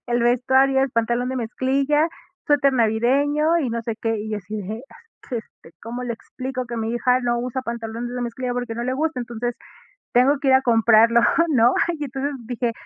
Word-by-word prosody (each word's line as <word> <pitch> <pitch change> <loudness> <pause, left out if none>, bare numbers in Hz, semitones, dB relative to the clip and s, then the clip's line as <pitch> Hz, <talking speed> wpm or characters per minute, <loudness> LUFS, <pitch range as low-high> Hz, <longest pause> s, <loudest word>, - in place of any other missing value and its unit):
el 240 0 0
vestuario, 265 +2 +3
es 270 - 0
pantalón 235 +2 0
de 260 - -3
mezclilla, 275 +6 +1 0.4
suéter 280 -2 +3
navideño, 275 +8 +2
y 260 -7 -1
no 230 0 -3
sé 230 0 -3
qué". 225 -1 0
Y, 215 +1 -5
yo, 215 - -1
así 210 +3 -7
de: 215 +5 -6
"Ah, - - -15 0.3
es - - -18
que 245 - -1
este, 210 -6 -11
¿cómo 240 +3 -5
le 240 -1 -3
explico? 255 +2 -6
Que 235 0 -5
mi 225 +1 -2
hija, 250 +1 +2
no 240 -1 0
usa 255 +1 -3
pantalones 235 0 -5
de 250 - -3
mezclilla, 245 +1 -3
porque 245 -2 -3
no 235 - -4
le 255 - -1
gusta". 305 -1 -1
Entonces, 240 0 -4 0.6
tengo 270 +4 +4
que 275 - -1
ir 260 - +6
a 265 - +5
comprarlo, 230 0 +5 0.3
¿no? 245 -4 +4 0.2
Y 295 - -3
entonces, 275 +2 -3
dije: 240 -1 -2
245 Hz, 210 wpm, -22 LUFS, 230-265 Hz, 0.6 s, ir